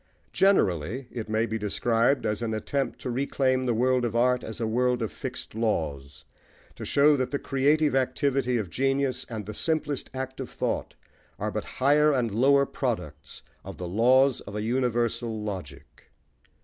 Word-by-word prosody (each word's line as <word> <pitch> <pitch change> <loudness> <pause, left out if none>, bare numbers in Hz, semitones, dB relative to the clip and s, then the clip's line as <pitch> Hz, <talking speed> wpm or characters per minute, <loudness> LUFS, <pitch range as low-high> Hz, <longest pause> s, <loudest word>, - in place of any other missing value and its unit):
Generally, 120 - +2
it 110 -3 -6
may 110 +1 +1
be 110 -1 -3
described 115 +5 +1
as 105 +1 -1
an 110 -2 -1
attempt 135 +5 -2
to 125 - -4
reclaim 130 0 0
the 120 - +2
world 125 +2 +2
of 115 -1 -2
art 125 +1 +2
as 110 +1 -7
a 115 - -1
world 125 +2 +1
of 110 - -3
fixed 130 -2 -7
laws, 80 -11 -2 0.5
to - - -8
show 145 +1 +4
that 130 -2 -1
the 140 - -1
creative 145 +3 +2
activity 130 -1 +1
of 100 -7 -4
genius 135 +2 0
and 110 -3 -5
the 105 - -6
simplest 155 +1 -1
act 130 0 -5
of 130 - -5
thought - - -3 0.4
are - - -2
but - - -3
higher 150 +3 +4
and 125 -5 0
lower 140 +6 +4
products 75 - -4 0.2
of - - -9
the 90 - -5
laws 125 +7 +3
of 100 - -7
a 105 - -2
universal 120 -1 0
logic. 75 -9 -8
125 Hz, 170 wpm, -27 LUFS, 110-135 Hz, 0.5 s, show